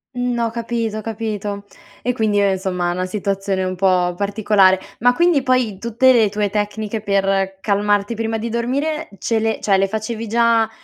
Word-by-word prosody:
N 245 -1 -1
ho 230 -1 0
capito 230 -1 -3
ho - - -4
capito. 210 -2 -4 0.4
E 250 - 0
quindi, 215 -4 +1
uhm, 200 -1 +3
insomma, 185 -2 -1
una 180 +1 -2
situazione 195 -1 -2
un 185 0 -2
pò 180 -1 +2
particolare. 200 -1 +3 0.2
Ma 245 +2 +4
quindi 340 -3 +3
poi 255 -6 0
tutte 235 +4 +3
le 225 -4 +4
tue 205 0 -1
tecniche 210 +1 -2
per 195 -1 0
calmarti 205 +1 +1
prima 225 0 -2
di 230 +2 -4
dormire 270 +7 -2
ce 225 +4 0
le 220 0 -1
cioè, 195 -2 +2
le 195 0 +2
facevi 220 +2 -4
già 230 0 +3
215 Hz, 175 wpm, -19 LUFS, 195-230 Hz, 0.4 s, Ma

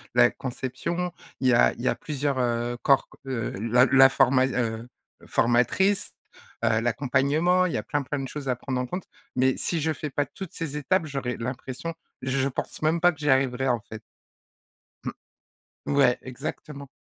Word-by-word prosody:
la 120 0 +7
conception. 135 +8 -3 0.3
Il 130 - +2
y 125 - +5
a 120 - +5
il - - -10
y 130 - +2
a - - +1
plusieurs, 145 -3 -2
heu, 120 0 0
corps 135 -1 +3
qu - - -19
heu, 115 -4 -2
la 120 +3 +4
la 135 0 +8
forma 130 -1 +4
heu, 120 -2 -2 0.4
formatrice. 125 - +2 0.5
Heu, 110 0 +3
l'accompagnement, 140 +9 +2
il 175 - -1
y - - 0
a - - -3
plein, 145 -2 -1
plein 145 +2 -3
de 135 - -4
choses 145 -2 -6
à 125 - +2
prendre 125 +1 -3
en 125 - -1
compte. 180 +6 -5 0.3
Mais 130 0 +2
si 165 -3 -1
je 160 - +1
fais 150 0 -5
pas 145 +2 0
toutes 190 +4 -9
ces 150 -3 -4
étapes, 165 +4 +1
j'aurais 135 -4 -3
l'impression, 130 +5 -5 0.3
je 130 +1 0
pense 130 - -5
même 160 +2 +1
pas 175 - +6
que 155 - -14
j'y 150 0 -1
arriverais, 130 0 +2
en 120 -2 +2
fait. 110 0 -8 1.0
Mmh. - - -3 0.8
Ouais, 135 -3 +3
exactement. 140 +2 -7
135 Hz, 185 wpm, -26 LUFS, 125-150 Hz, 1.0 s, la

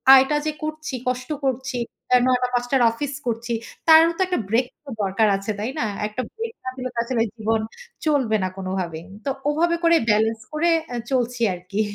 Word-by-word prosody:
আয়টা 270 +3 +5
যে 310 - +1
করছি, 310 -1 -4
কষ্ট 250 0 -2
করছি, 260 -1 -1 0.5
৯ 250 -1 +3
টা - - +3
৫ 245 0 +1
টার 270 -2 +4
অফিস 280 +5 -4
করছি, 235 0 -2 0.3
তারও 320 +1 +8
তো - - -1
একটা 360 -7 0
ব্রেক 235 +4 +3 0.2
তো 275 - -9
দরকার 195 +3 +2
আছে, 200 +2 -3
তাই 225 +5 -2
না? - - +1 0.2
একটা 215 +4 -4
ব্রেক 455 0 -4
না - - -1
দিলে 255 -1 -4
আসলে 235 -1 -1
জীবন 220 0 0 0.4
চলবে 265 -8 +2
না 185 - 0
কোনোভাবেই। 185 -4 -3 0.2
তো - - 0 0.2
ওভাবে 335 +3 +2
করে 335 0 +6
ব্যালেন্স 220 +1 +2
করে 330 +3 +2 0.2
আ - - -2 0.2
চলছি 245 -2 0
আরকি। 180 +4 -3
250 Hz, 185 wpm, -23 LUFS, 220-295 Hz, 0.5 s, তারও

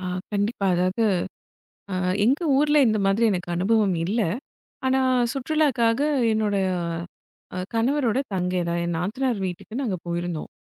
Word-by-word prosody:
ஆ, - - -7 0.3
கண்டிப்பா. 205 0 0
அதாவது, 185 +5 0 0.9
அ - - -1 0.3
எங்க 270 +9 +2
ஊர்ல 295 +2 +3
இந்த 215 -1 +1
மாதிரி 195 +4 +2
எனக்கு 180 -2 -3
அனுபவம் 195 0 +2
இல்ல. 220 +5 +1 0.6
ஆனா 260 0 +3 0.3
சுற்றுலாக்காக 270 -4 +1 0.3
என்னோட 215 -2 0 1.0
அ - - -2 0.2
கணவரோட 250 0 +1 0.2
தங்கை, 180 0 0
அதாவது 170 0 -1
என் 170 -1 -1
நாத்தனார் 230 +6 -1
வீட்டுக்கு 180 +5 -7
நாங்க 215 -8 -1
போயிருந்தோம். 170 -2 -3
215 Hz, 130 wpm, -24 LUFS, 180-245 Hz, 1.0 s, ஊர்ல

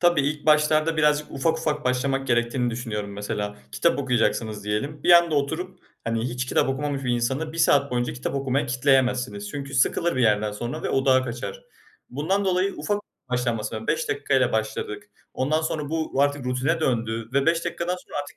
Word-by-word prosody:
Tabii, 175 -3 +4
ilk 150 +2 -2
başlarda 155 +1 +4
birazcık 150 -1 +2
ufak, 160 +4 0
ufak 155 -2 -2
başlamak 135 +1 0
gerektiğini 120 0 +1
düşünüyorum. 110 -4 -4
Mesela, 105 0 -4 0.2
kitap 170 - +2
okuyacaksınız 115 -5 0
diyelim. 140 +9 -3
Bir - - +3
anda 170 -2 +6
oturup 160 +6 -2 0.3
hani 115 0 -1
hiç 125 +1 -3
kitap 130 - +2
okumamış 140 0 -2
bir 125 - 0
insanı 130 +6 -1
1 165 - -7
saat 140 -3 +4
boyunca 120 0 -1
kitap 125 +2 -4
okumaya 140 +1 0
kitleyemezsiniz. 125 -5 +1
Çünkü 140 -1 -6
sıkılır 140 +4 +2
bir 130 - +2
yerden 105 -1 +2
sonra 120 +4 -5
ve - - -1
odağı 130 -1 +3
kaçar. 120 - -6 0.5
Bundan 180 +10 0
dolayı 185 +1 +1
ufak 205 0 -1 0.3
başlanması 120 -4 -1
la 110 - -6
5 480 -2 0
dakika 430 0 -1
ile - - +3
başladık. 420 -3 -3 0.2
Ondan 155 +5 +1
sonra 155 -2 -2
bu 160 -4 0
artık 145 -2 0
rutine 130 +6 0
döndü 115 -5 -1
ve 140 0 +2
5 165 0 +2
dakikadan 175 +1 -2
sonra - - -8
artık 145 - -13
135 Hz, 185 wpm, -24 LUFS, 120-155 Hz, 0.5 s, anda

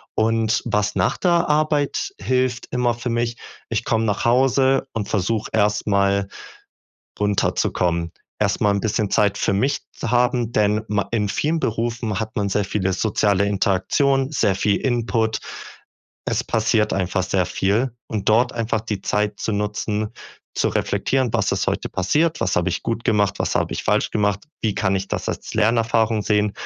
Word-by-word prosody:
Und 115 0 +1
was 105 -2 0
nach 90 -2 +1
der 175 -1 +2
Arbeit 150 -1 +1
hilft 125 +2 0
immer 125 -1 +1
für 120 +1 -5
mich 120 0 -1 0.3
ich 115 0 -1
komme 115 -1 +1
nach 105 -2 -1
Hause 130 +2 +3
und 105 -3 -3
versuche 110 +2 -1
erst 105 -1 +2
mal 100 0 +2 0.9
runterzukommen. 90 -4 0 0.3
Erst 100 0 0
mal 105 -1 +4
'n 100 - 0
bisschen 110 -2 0
Zeit 105 -3 +2
für - - +1
mich 135 +8 +1
zu 115 - -5
haben, 120 -1 +1
denn 105 0 +2
ma 105 -1 -1
in 105 -3 +1
vielen 155 +9 0
Berufen 115 -3 -2
hat 110 0 -5
man 100 - +1
sehr 100 +1 0
viele 95 -2 -1
soziale 100 0 +1
Interaktionen, 130 +8 +1
sehr 100 -9 +1
viel 100 +1 +1
Input. 115 -3 0 0.9
Es - - 0
passiert 110 -1 +1
einfach 95 0 0
sehr 95 0 +1
viel. 105 +9 0 0.2
Und 105 -3 -4
dort 120 +4 +4
einfach 115 -2 -1
die 105 -3 -4
Zeit 105 0 -1
zu 110 - -2
nutzen, 105 +1 -2 0.4
zu - - +1
reflektieren: 130 -3 0
„Was - - +1
ist - - -1
heute - - -1
passiert? 155 - +1
Was 95 - +1
habe 90 +1 +1
ich - - -3
gut 115 0 -2
gemacht? 100 -3 +2
Was - - -1
habe - - 0
ich - - -4
falsch - - +1
gemacht? 105 -2 0 0.2
Wie 110 -3 0
kann 95 -2 +1
ich 95 +1 -2
das - - -3
als - - -5
Lernerfahrung 110 0 +2
sehen?“ 105 0 +2
110 Hz, 170 wpm, -21 LUFS, 100-120 Hz, 0.9 s, mal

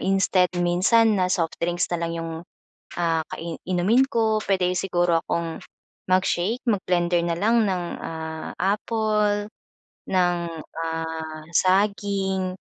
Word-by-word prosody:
instead 190 -1 +2
minsan 190 +5 +3
na 185 - +2
soft 165 -3 -1
drinks 175 +1 -1
na 175 - -1
lang 165 0 -2
'yong 165 0 -4 0.7
ah, 165 -2 +1
ka - - -8 0.3
inumin 185 +8 +3
ko, 220 -3 +1
pwede 185 -2 +1
siguro 175 -2 +1
akong 170 -2 -3 0.5
mag-shake, 185 +4 +1
mag-blender 180 -5 +1
na 170 -1 -1
lang 225 +4 +3
ng 185 -3 0 0.2
ah, 160 -1 -5
apple, 210 +1 +1 0.6
ng 180 -1 +2 0.4
ah, 160 -1 -4
saging, 195 -1 +1
185 Hz, 120 wpm, -24 LUFS, 170-205 Hz, 0.7 s, minsan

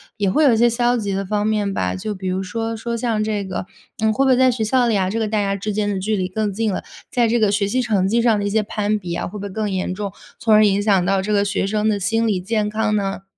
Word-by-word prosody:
也 200 -3 0
会 305 +9 +3
有 260 - +5
一 - - +2
些 240 +1 +5
消 240 +1 +1
极 205 -4 -2
的 195 +1 -2
方 205 +1 -1
面 210 -2 0
吧。 - - -1
就 210 +2 -4
比 185 -1 -4
如 185 +1 -1
说 225 +4 -3
说 235 +1 -3
像 230 -2 -1
这 215 -1 -1
个， 190 -1 -4 0.4
嗯， 220 0 +2
会 270 +5 +1
不 270 - +3
会 255 - +5
在 260 0 +5
学 235 -2 -1
校 245 +2 +2
里 220 - +2
啊， 185 -1 0
这 225 +4 -2
个 220 - 0
大 210 0 0
家 200 0 -1
之 205 +1 -3
间 205 0 0
的 195 -2 -1
距 215 +3 -1
离 185 -2 -2
更 210 +1 -2
近 220 +1 0
了， 185 - -3 0.3
在 240 -2 +2
这 235 +2 +2
个 210 -2 +3
学 205 -1 +1
习 255 +6 0
成 205 -6 +1
绩 230 +4 +2
上 230 -3 +3
的 205 - -2
一 205 - 0
些 220 +1 +1
攀 210 0 -1
比 180 -4 -7
呀， 170 - -2
会 210 - -8
不 200 - -7
会 200 - -4
更 210 +2 -2
严 185 -1 -2
重？ 200 0 -5 0.3
从 225 - +2
而 215 0 +6
影 200 0 +2
响 195 -4 +2
到 195 +1 +2
这 210 +2 -2
个 200 -1 +3
学 200 -1 -1
生 215 +1 +1
的 205 -2 0
心 225 +5 0
理 205 -4 +1
健 210 +3 -1
康 215 0 0
呢？ 195 -2 -2
210 Hz, 335 characters per minute, -20 LUFS, 195-225 Hz, 0.4 s, 而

